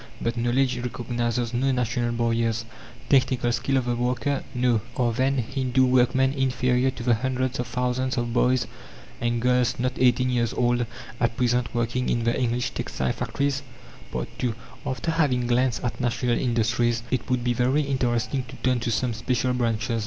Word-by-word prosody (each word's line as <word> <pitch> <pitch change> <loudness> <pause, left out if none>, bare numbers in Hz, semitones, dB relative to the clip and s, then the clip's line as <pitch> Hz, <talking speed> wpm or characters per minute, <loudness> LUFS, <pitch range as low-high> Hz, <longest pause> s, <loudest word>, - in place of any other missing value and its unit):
But 115 0 -1
knowledge 120 +2 +1
recognizes 120 -1 -2
no 135 +3 +1
national 120 -1 0
barriers. 115 -1 0 0.4
Technical 130 -3 +3
skill 125 +3 0
of 130 - 0
the 120 -1 0
worker? 125 +4 -1
No. 125 -3 +2 0.2
Are, 120 -2 +2
then, 135 +3 +1
Hindoo 130 +1 +1
workmen 130 +1 +3
inferior 130 -1 +1
to 125 -2 -6
the 120 0 +3
hundreds 130 +2 -1
of 125 - -2
thousands 125 +1 -1
of 120 -1 -1
boys 125 +1 +3 0.6
and 120 0 0
girls, 125 0 +2
not 125 +1 0
eighteen 125 0 +3
years 120 -2 +1
old, 120 -1 +1 0.3
at 115 -1 0
present 125 -1 +1
working 120 +2 0
in 120 - +1
the 115 +1 +1
English 125 -1 0
textile 65 -1 -2
factories? 140 0 -1 0.8
II 120 -3 0 0.3
After 130 +5 -1
having 140 -7 +1
glanced 125 0 +1
at 125 - -3
national 120 0 0
industries 115 -1 +1
it 130 -1 -1
would 125 -1 +1
be 120 0 +1
very 130 +5 +2
interesting 130 -1 0
to - - -10
turn 130 -1 +2
to 120 - -2
some 120 +1 0
special 125 +2 0
branches. 115 -1 0
125 Hz, 165 wpm, -25 LUFS, 120-130 Hz, 0.8 s, Technical